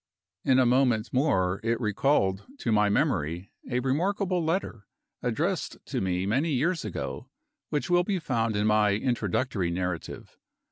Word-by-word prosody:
In 130 - +4
a 130 - +5
moment 125 -2 +2
more 100 -9 +2
it 115 0 0
recalled 105 -3 +1
to 115 - -2
my 105 -1 +4
memory 85 -2 0 0.2
a 125 -1 0
remarkable 180 - 0
letter, 160 - -2 0.3
addressed - - -1
to - - -3
me 90 -1 0
many 135 +11 +1
years 165 +5 +1
ago, 105 -5 -5 0.4
which 145 - -1
will 175 0 +3
be 195 +1 -1
found 115 - -1
in 105 +1 +1
my 105 -1 +4
introductory 110 -4 -1
narrative. 90 -1 -4
115 Hz, 145 wpm, -27 LUFS, 100-140 Hz, 0.4 s, a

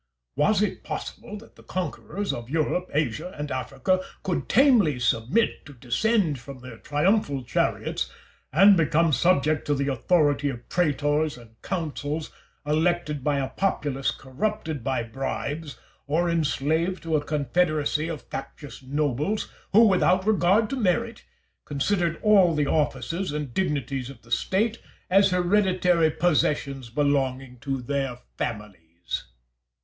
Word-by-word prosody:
Was 205 +9 +3
it 210 - -3
possible 210 - -6
that 220 - -16
the - - -15
conquerors 195 +2 -4
of 120 0 -7
Europe, 165 +4 0
Asia, 155 - -2
and 150 0 -4
Africa 185 +8 0 0.2
could 180 - -2
tamely 225 - +4
submit 120 - +1
to 145 - -11
descend 150 - 0
from 135 +2 -10
their 125 -2 -10
triumphal 145 - +1
chariots - - -1 0.4
and 195 +7 +7
become 165 -1 +2
subject 155 -2 +2
to 145 - +2
the 140 0 -1
authority 145 +1 +2
of 120 -3 -7
praetors 150 -3 +1
and 115 -2 -15
consuls 155 -3 -3 0.3
elected 155 -1 0
by 145 0 +1
a 135 -1 -1
populace 145 -8 -1
corrupted 155 - -3
by 130 -2 -1
bribes, 135 +5 -4 0.3
or 170 +4 +1
enslaved 165 +3 0
to 165 -1 0
a 145 - +1
confederacy 155 +1 0
of 165 -3 -5
factious 135 -1 -8
nobles, 145 - -1 0.2
who, 225 +4 +7
without 185 -2 +3
regard 210 +1 +3
to - - 0
merit, 230 0 0 0.4
considered 170 +3 0
all 195 -6 +5
the 150 -1 +1
offices 165 +5 -1
and 150 -4 -4
dignities 135 -6 -1
of 135 - -12
the 115 - -19
State 215 - 0 0.3
as 195 +1 +6
hereditary 180 -2 +3
possessions 150 -5 0
belonging 135 -2 0
to 135 -1 -3
their 135 -1 -2 0.2
families? 90 -6 -5
150 Hz, 135 wpm, -25 LUFS, 135-180 Hz, 0.4 s, and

